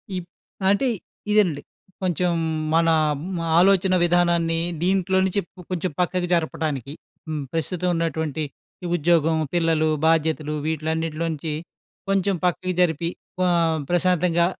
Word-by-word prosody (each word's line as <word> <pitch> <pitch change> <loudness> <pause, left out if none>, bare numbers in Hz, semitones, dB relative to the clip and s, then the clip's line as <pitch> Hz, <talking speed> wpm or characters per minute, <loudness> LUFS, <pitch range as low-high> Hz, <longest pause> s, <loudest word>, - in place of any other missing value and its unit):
ఈప్ 180 -1 -5 0.4
అంటే 205 +7 +3 0.4
ఇదేనండి. 180 -9 +3 0.4
కొంచెం 180 0 +1 0.4
మన 165 0 +4 0.5
మ్ - - -2 0.2
ఆలోచన 190 0 +4
విధానాన్ని 170 -1 +2 0.3
దీంట్లో 190 0 +2
నుంచి 195 +2 0
ప్ 180 - -21
కొంచెం 180 -1 -1
పక్కకు 180 0 0
జరపడానికి, 150 -5 -1 0.3
హ్మ్. 155 -2 -3
ప్రస్తుతం 180 +2 -1
ఉన్నటువంటి 160 -2 -1 0.4
ఈ 175 - -3
ఉద్యోగం, 160 0 +3 0.2
పిల్లలు, 165 -2 +2 0.2
బాధ్యతలు 155 -1 +1
వీటిలన్నిటిలో 160 +1 -2
నుంచి 155 0 -4 0.6
కొంచెం 195 0 +2
పక్కకి 185 +1 0
జరిపి 165 -1 +1 0.4
ఆహ్, 165 -2 +2
ప్రశాంతంగా 175 -1 +2
170 Hz, 115 wpm, -23 LUFS, 160-180 Hz, 0.6 s, మన